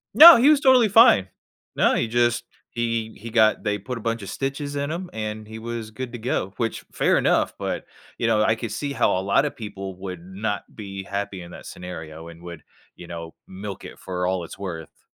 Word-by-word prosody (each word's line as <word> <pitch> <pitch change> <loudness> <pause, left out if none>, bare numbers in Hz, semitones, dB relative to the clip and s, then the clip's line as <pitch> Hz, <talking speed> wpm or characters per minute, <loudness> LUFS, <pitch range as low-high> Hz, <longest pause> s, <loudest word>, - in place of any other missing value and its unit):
No, 335 -1 +12
he 265 +6 +5
was 300 -2 +5
totally 255 -4 +6
fine. 210 - +6 0.5
No, - - +3
he 120 - +1
just 120 0 +1 0.2
he 115 -1 -2
he 115 +3 -7
got 110 -1 +3
they 105 -1 0
put 125 +5 -6
a - - -8
bunch 115 +1 -2
of - - -7
stitches 140 +1 -3
in 140 +1 -2
him, 175 +3 -4
and 110 0 -5
he 110 +1 -8
was 115 -1 -5
good 125 +2 -6
to - - -4
go, 110 -5 -2
which 115 -2 -2
fair - - +3
enough, - - +2
but, - - -3 0.3
you - - -1
know, 110 -2 +3
I 110 +1 +3
could 115 -1 -5
see 140 +6 -3
how 130 - +2
a - - -1
lotta 100 +10 +2
people 100 -4 -7
would 90 -2 -7
not 100 +2 -3
be 100 -2 -7
happy 100 -1 -4
in 85 0 -11
that - - -11
scenario 80 -3 -8
and 85 0 -13
would, 85 -3 -9 0.3
you 90 - -11
know, 85 -1 -7
milk 95 +1 -7
it - - -11
for 90 -1 -3
all 90 -1 0
it's - - -11
worth. 85 -5 -8
110 Hz, 215 wpm, -24 LUFS, 95-120 Hz, 0.5 s, No